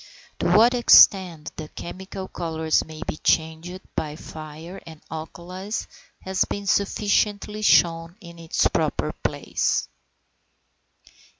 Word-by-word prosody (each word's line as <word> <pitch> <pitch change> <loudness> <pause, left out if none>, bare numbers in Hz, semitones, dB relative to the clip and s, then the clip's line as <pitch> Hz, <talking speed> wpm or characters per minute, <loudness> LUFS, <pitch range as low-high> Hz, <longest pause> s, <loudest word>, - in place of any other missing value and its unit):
To - - 0
what 225 +6 +6
extent 185 -9 +5
the 155 - -6
chemical 190 +3 -8
colours 160 -2 -1
may 160 -1 -9
be - - -3
changed 160 +4 -1
by 150 -1 -3
fire 160 +3 -10
and 160 -2 -12
alkalis, 180 +6 -6 0.4
has 190 -1 0
been 200 0 -5
sufficiently 205 +1 0
shown 165 -4 +3
in 170 -3 -13
its 165 -1 +1
proper - - -1
place. - - -1
170 Hz, 110 wpm, -24 LUFS, 160-195 Hz, 0.4 s, what